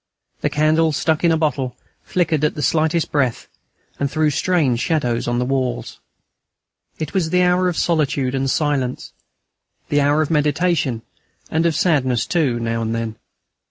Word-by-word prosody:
The -, -, 0 dB
candle, 155 Hz, +1 st, +2 dB
stuck 160 Hz, +2 st, 0 dB
in 170 Hz, -, +4 dB
a 160 Hz, -, +2 dB
bottle, 140 Hz, -5 st, -1 dB, 0.3 s
flickered 160 Hz, -4 st, 0 dB
at 150 Hz, -, +1 dB
the 150 Hz, -, -3 dB
slightest 160 Hz, +1 st, +1 dB
breath, 130 Hz, -5 st, 0 dB, 0.5 s
and 140 Hz, -, 0 dB
threw 155 Hz, 0 st, +1 dB
strange 145 Hz, -6 st, +1 dB
shadows 125 Hz, -7 st, 0 dB
on 120 Hz, 0 st, 0 dB
the 125 Hz, -, 0 dB
walls. 130 Hz, -2 st, -2 dB, 1.0 s
It 155 Hz, -2 st, -5 dB
was 180 Hz, -4 st, 0 dB
the 180 Hz, +2 st, +3 dB
hour 180 Hz, +1 st, +3 dB
of 175 Hz, -, -4 dB
solitude 145 Hz, -6 st, 0 dB
and 135 Hz, 0 st, 0 dB
silence, 135 Hz, -3 st, -1 dB, 0.8 s
the 145 Hz, 0 st, +2 dB
hour 145 Hz, +2 st, +3 dB
of 155 Hz, -, -4 dB
meditation 150 Hz, -5 st, +1 dB, 0.5 s
and 165 Hz, +1 st, +2 dB
of 165 Hz, -, 0 dB
sadness 130 Hz, -, +1 dB
too 145 Hz, -9 st, 0 dB
now 115 Hz, 0 st, -2 dB
and 115 Hz, 0 st, -2 dB
then. 115 Hz, -1 st, -4 dB
150 Hz, 160 wpm, -20 LUFS, 130-160 Hz, 1.0 s, in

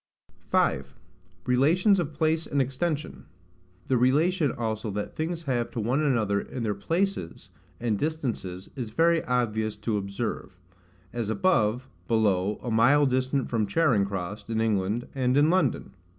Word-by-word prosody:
5. 70 Hz, +1 st, +1 dB, 0.5 s
Relations 170 Hz, +11 st, +3 dB
of 160 Hz, -3 st, -2 dB
Place 160 Hz, +1 st, +1 dB
and 140 Hz, -, -1 dB
Extension. 145 Hz, +4 st, -2 dB, 0.6 s
The 130 Hz, -, +2 dB
relation 150 Hz, +5 st, +2 dB
also 110 Hz, -2 st, -3 dB
that 105 Hz, +1 st, -4 dB
things 165 Hz, +1 st, -3 dB
have 125 Hz, -5 st, -1 dB
to -, -, -5 dB
one 125 Hz, +7 st, +1 dB
another 110 Hz, -9 st, +1 dB
in 125 Hz, -, -6 dB
their 105 Hz, -2 st, 0 dB
PLACES 165 Hz, -, -2 dB, 0.3 s
and 115 Hz, -4 st, -1 dB
distances 120 Hz, -, -3 dB
is 125 Hz, -5 st, -4 dB
very 165 Hz, +6 st, +2 dB
obvious 110 Hz, -3 st, 0 dB
to 105 Hz, +1 st, -2 dB
observe; 100 Hz, -1 st, -4 dB, 0.6 s
as 115 Hz, -3 st, -3 dB
above, 125 Hz, -, +1 dB, 0.2 s
below, 105 Hz, -3 st, +1 dB
a 120 Hz, -, -3 dB
mile 130 Hz, +7 st, +5 dB
distant 130 Hz, 0 st, 0 dB
from 110 Hz, -3 st, 0 dB
Charing 110 Hz, -3 st, +2 dB
cross, 100 Hz, +1 st, -5 dB
in 110 Hz, -1 st, -1 dB
England, 110 Hz, +1 st, 0 dB
and 130 Hz, -1 st, +1 dB
in 150 Hz, +3 st, +5 dB
London. 170 Hz, -, 0 dB
120 Hz, 145 wpm, -27 LUFS, 105-150 Hz, 0.6 s, mile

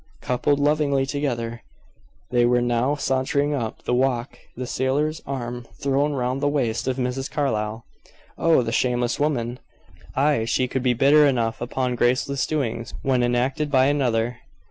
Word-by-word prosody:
Coupled 140 Hz, +3 st, 0 dB
lovingly 145 Hz, -2 st, +2 dB
together, 120 Hz, -5 st, -3 dB, 0.7 s
they 120 Hz, -1 st, +3 dB
were 120 Hz, +1 st, +3 dB
now 120 Hz, +3 st, +1 dB
sauntering 140 Hz, +1 st, 0 dB
up 115 Hz, -6 st, -4 dB
the -, -, -1 dB
walk, 125 Hz, 0 st, 0 dB, 0.2 s
the 125 Hz, -, -3 dB
sailor's 145 Hz, +5 st, -1 dB
arm 120 Hz, -3 st, -5 dB
thrown 140 Hz, +2 st, +1 dB
round 130 Hz, 0 st, -1 dB
the 145 Hz, -, +2 dB
waist 125 Hz, -5 st, -1 dB
of 130 Hz, 0 st, 0 dB
Mrs. 130 Hz, +1 st, -2 dB
Carlyle. 110 Hz, -6 st, -2 dB, 0.5 s
"Oh! 165 Hz, -6 st, +3 dB
The 115 Hz, -, -3 dB
shameless 120 Hz, +1 st, 0 dB
woman!" 125 Hz, -5 st, -1 dB, 0.6 s
Ay; 140 Hz, -4 st, +2 dB
she 125 Hz, +2 st, +1 dB
could 130 Hz, +1 st, -2 dB
be 125 Hz, -1 st, +2 dB
bitter 145 Hz, +4 st, +5 dB
enough 115 Hz, -5 st, 0 dB
upon 125 Hz, +1 st, -1 dB
graceless 125 Hz, +3 st, +1 dB
doings 125 Hz, -6 st, -3 dB
when 130 Hz, -2 st, +2 dB
enacted 125 Hz, +5 st, 0 dB
by 130 Hz, -2 st, +4 dB
another. 125 Hz, -4 st, 0 dB
130 Hz, 150 wpm, -23 LUFS, 120-140 Hz, 0.7 s, bitter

